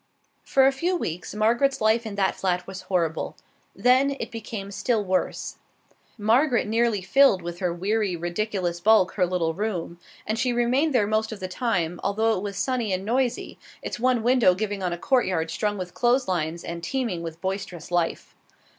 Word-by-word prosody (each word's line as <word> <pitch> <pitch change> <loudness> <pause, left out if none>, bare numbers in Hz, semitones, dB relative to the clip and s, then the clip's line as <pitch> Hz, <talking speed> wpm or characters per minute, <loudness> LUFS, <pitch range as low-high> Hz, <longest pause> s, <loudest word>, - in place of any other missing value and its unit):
For 265 -1 +3
a 270 - +5
few 340 +7 -1
weeks 175 - -5
Margaret's 240 +6 +2
life 220 +1 +2
in 205 - -6
that 195 -1 +1
flat 180 -1 -1
was 190 0 -8
horrible; 170 -4 -1 0.4
then 255 +6 +3
it - - -5
became 215 -3 -6
still 215 +1 0
worse. 185 0 -2 0.6
Margaret 235 +4 +3
nearly 225 -2 +1
filled 195 -2 +4
with 175 0 -6
her 180 -2 0
weary, 195 +2 -1
ridiculous 175 0 -2
bulk 205 -1 +4
her 180 -3 +1
little 170 -2 0
room, 175 -3 -3 0.3
and 220 +1 -2
she 250 0 +1
remained 255 +5 +1
there 210 - +4
most 220 +1 0
of 215 - -7
the 185 - -4
time, 180 -5 -1
although 220 +3 +1
it 185 - -3
was 200 -1 -5
sunny 250 -5 -1
and 185 +1 -2
noisy, 245 +2 -1 0.2
its - - -5
one 250 -2 +2
window 240 -7 +4
giving 205 0 -3
on 180 -1 -1
a 175 - -3
courtyard 185 -9 +1
strung 205 +4 -1
with 180 -2 -6
clothes 245 +2 +2
lines 170 -2 -2
and 170 0 -6
teeming 230 -5 -2
with 165 -1 -7
boisterous 190 -3 -5
life. 175 -1 -1
205 Hz, 180 wpm, -25 LUFS, 180-235 Hz, 0.6 s, a